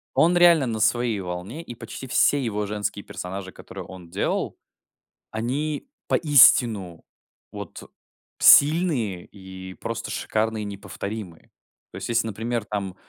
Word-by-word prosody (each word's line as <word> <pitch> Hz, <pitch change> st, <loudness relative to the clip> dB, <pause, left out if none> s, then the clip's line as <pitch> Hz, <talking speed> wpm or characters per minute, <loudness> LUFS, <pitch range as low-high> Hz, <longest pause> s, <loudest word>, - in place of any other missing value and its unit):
Он 175 Hz, +2 st, +4 dB
реально 170 Hz, -6 st, +6 dB
на 110 Hz, -2 st, -3 dB
своей 115 Hz, -1 st, +1 dB
волне, 90 Hz, -, -6 dB
и 120 Hz, -, -9 dB
почти 130 Hz, -, -9 dB
все 140 Hz, +2 st, +3 dB
его 105 Hz, -3 st, -2 dB
женские 105 Hz, 0 st, -4 dB
персонажи, 95 Hz, +1 st, -7 dB
которые -, -, -10 dB
он 90 Hz, -3 st, -12 dB
делал, -, -, -2 dB, 0.8 s
они 140 Hz, -, -3 dB, 0.2 s
поистину, 115 Hz, -, +4 dB, 0.5 s
вот, -, -, -8 dB
э, -, -, -14 dB, 0.5 s
сильные, 140 Hz, -, +5 dB
и 95 Hz, -1 st, -11 dB
просто 115 Hz, 0 st, -5 dB
шикарные, 110 Hz, 0 st, -1 dB
и -, -, -5 dB
неповторимые. 100 Hz, -2 st, -7 dB, 0.4 s
То -, -, -13 dB
есть, -, -, -6 dB
если, 115 Hz, -1 st, +1 dB
например, 115 Hz, +1 st, -3 dB
там, 100 Hz, -3 st, -4 dB
110 Hz, 135 wpm, -24 LUFS, 95-125 Hz, 0.8 s, реально